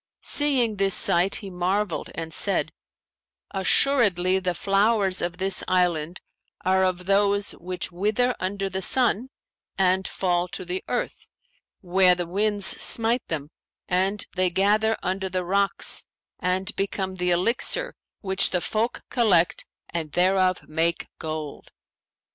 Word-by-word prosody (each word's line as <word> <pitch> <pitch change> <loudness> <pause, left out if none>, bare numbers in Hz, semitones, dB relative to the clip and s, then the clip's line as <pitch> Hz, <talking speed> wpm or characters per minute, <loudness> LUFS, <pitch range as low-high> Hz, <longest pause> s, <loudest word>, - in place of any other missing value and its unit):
Seeing 255 -7 +2
this 195 -1 +3
sight, 180 +3 +4
he 195 -3 -6
marvelled 185 +1 -2
and 165 -1 -6
said, 200 - 0 0.8
'Assuredly, 190 -3 +2
the 180 -1 -2
flowers 195 0 +1
of 175 0 -3
this 190 +1 +1
island 175 -2 0 0.4
are 190 0 +3
of 180 -1 -1
those 200 +1 +2
which 180 +1 -5
wither 215 +8 0
under 195 +1 -3
the 190 0 -4
sun 250 +2 +2 0.5
and 190 0 +2
fall 175 -1 -1
to 185 +1 -7
the 180 +1 -4
earth, - - -4 0.5
where 185 -1 +4
the 175 0 -3
winds 205 +3 0
smite 230 +4 +2
them 150 -2 -5 0.4
and 190 +3 0
they 185 0 +2
gather 210 +4 +1
under 190 +1 -2
the 185 -1 -3
rocks 200 +2 +1 0.4
and 190 +3 -2
become 195 -1 -3
the 180 -1 -2
Elixir[FN#523] 230 - +1 0.3
which 190 -2 +2
the 180 - 0
folk 220 +7 -2
collect 195 -9 +2 0.2
and 160 -3 -4
thereof 185 0 +1
make 165 +2 -1
gold.' 155 -2 -6
190 Hz, 130 wpm, -24 LUFS, 180-205 Hz, 0.8 s, sight